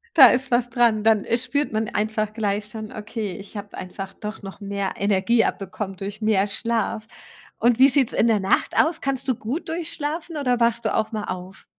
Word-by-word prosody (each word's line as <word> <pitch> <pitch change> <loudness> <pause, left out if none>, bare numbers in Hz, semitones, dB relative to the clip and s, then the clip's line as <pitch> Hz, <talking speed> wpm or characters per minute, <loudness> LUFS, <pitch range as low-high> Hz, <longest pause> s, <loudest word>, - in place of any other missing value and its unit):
Da 270 -5 +11
ist 255 +1 +1
was 240 0 +2
dran. 230 -3 +2
Dann, 220 -2 +4
äh, 235 - +1
spürt 260 +3 -1
man 220 0 -1
einfach 215 0 -1
gleich 205 -2 -1
schon: 215 0 -7
„Okay, 215 -2 -5
ich 200 +2 -12
habe 205 0 -7
einfach 190 +1 -7
doch 210 +1 -7
noch 195 +1 -9
mehr 200 -1 -3
Energie 205 +3 +2
abbekommen 195 0 -4
durch 200 +3 -7
mehr 210 -2 +2
Schlaf.“ 225 0 -1 0.5
Und 240 +1 +3
wie 270 - +9
sieht's 265 -3 +2
in 235 - +2
der 220 -3 +3
Nacht 190 - +1
aus? 320 +1 +3
Kannst 270 -1 -2
du 255 - +2
gut 265 +11 -4
durchschlafen 320 0 -3
oder 250 -4 +1
wachst 235 0 +2
du - - +1
auch 215 - 0
mal 210 -1 -3
auf? 185 +1 -7
220 Hz, 205 wpm, -23 LUFS, 205-245 Hz, 0.5 s, Da